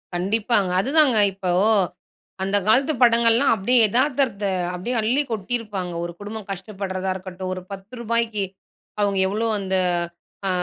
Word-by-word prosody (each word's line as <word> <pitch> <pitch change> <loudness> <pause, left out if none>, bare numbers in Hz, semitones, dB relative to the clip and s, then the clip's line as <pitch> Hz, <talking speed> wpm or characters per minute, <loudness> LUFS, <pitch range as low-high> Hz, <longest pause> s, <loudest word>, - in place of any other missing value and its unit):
கண்டிப்பாங்க. 205 +2 0
அதுதாங்க 275 0 +4 0.2
இப்போ 185 -1 -3 0.9
அந்த 195 +1 +1
காலத்து 270 +7 +4
படங்கள்லாம் 235 +1 +5
அப்படி 220 +5 -1
எதார்த்தத்த 250 -3 +1 0.3
அப்படி 180 +7 -4
அள்ளி 240 +7 +2
கொட்டியிருப்பாங்க. 210 -4 -3
ஒரு 175 - -4
குடும்பம் 210 0 -7
கஷ்டப்படுறதா 190 -1 -4
இருக்கட்டும். 185 0 -6
ஒரு 185 - -6
ரூ.10க்கு 225 +1 -2 0.6
அவங்க 200 -1 +1
எவ்ளோ 215 +4 -1
அந்த 190 -1 -2 0.7
அ - - +1
210 Hz, 120 wpm, -22 LUFS, 190-235 Hz, 0.9 s, படங்கள்லாம்